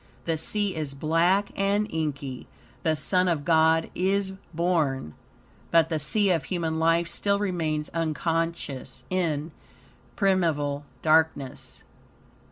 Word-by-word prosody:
The 165 - 0
sea 200 +5 -1
is 150 -3 -4
black 170 +7 +2
and 200 +2 +1
inky. 140 -5 -3 0.3
The 160 -1 +1
Son 180 +4 +2
of 160 -5 0
God 160 0 +3
is 190 +1 0 0.2
born, 155 - 0 0.6
but 165 -1 +4
the 160 -2 -1
sea 200 +6 +2
of 165 -4 0
human 165 -3 -2
life 165 +1 +3
still 200 +3 0
remains 165 -6 -1
unconscious, 165 -4 -2
in 160 -4 -1 0.6
primeval 155 -7 +1 0.2
darkness. 155 -4 +1
165 Hz, 115 wpm, -26 LUFS, 155-180 Hz, 0.6 s, but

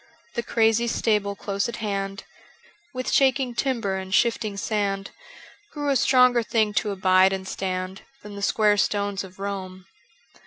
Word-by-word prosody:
The 235 - -1
crazy 225 0 +2
stable 210 -3 0
close 200 +2 -2
at 235 - -5
hand, 195 -3 -3 0.7
With 255 -1 -4
shaking 265 -2 +2
timber 235 -6 -1
and 190 0 -7
shifting 215 0 +1
sand, 200 -2 -2 0.6
Grew 290 -1 -2
a - - +2
stronger 250 -1 +4
thing 220 -2 0
to 215 - -4
abide 185 -1 +4
and 190 0 -4
stand 185 0 -4 0.2
Than 210 0 -9
the 200 - -7
square 210 +1 +3
stones 200 -1 0
of 185 -1 -13
Rome. 190 -2 -6
205 Hz, 150 wpm, -24 LUFS, 195-235 Hz, 0.7 s, stronger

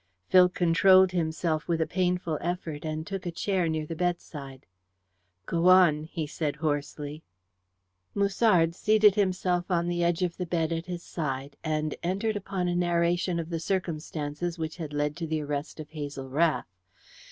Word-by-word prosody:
Phil 180 -1 +7
controlled 180 +2 +5
himself 160 -2 -1
with 170 -1 0
a 160 - +2
painful 180 -3 -1
effort, 170 -4 -3
and 155 0 -3
took 195 -1 -5
a - - -2
chair 180 0 0
near 160 -1 -1
the 165 - -5
bedside. 150 -6 -4 0.8
"Go 170 +6 +1
on," 170 -5 +6
he 160 -1 -4
said 150 -1 -3
hoarsely. 150 0 -3 0.9
Musard 200 -4 +3
seated 215 +2 +4
himself 185 -3 0
on 170 -2 +1
the 175 0 0
edge 170 +1 +1
of 175 -2 -2
the 180 - -3
bed 165 -1 0
at 165 +1 -4
his 175 -1 -5
side, 140 -3 -4
and 155 -1 -1
entered 195 +5 -1
upon 195 -2 -2
a 175 - 0
narration 175 0 +1
of 165 +1 -5
the 165 - -1
circumstances 165 -2 -3
which 160 0 -4
had 160 -4 -5
led 145 0 -1
to 165 -1 -3
the 155 0 -1
arrest 145 +2 -4
of 155 -1 -8
Hazel 145 -3 -6
Rath. 155 +4 +1
170 Hz, 165 wpm, -28 LUFS, 155-180 Hz, 0.9 s, Phil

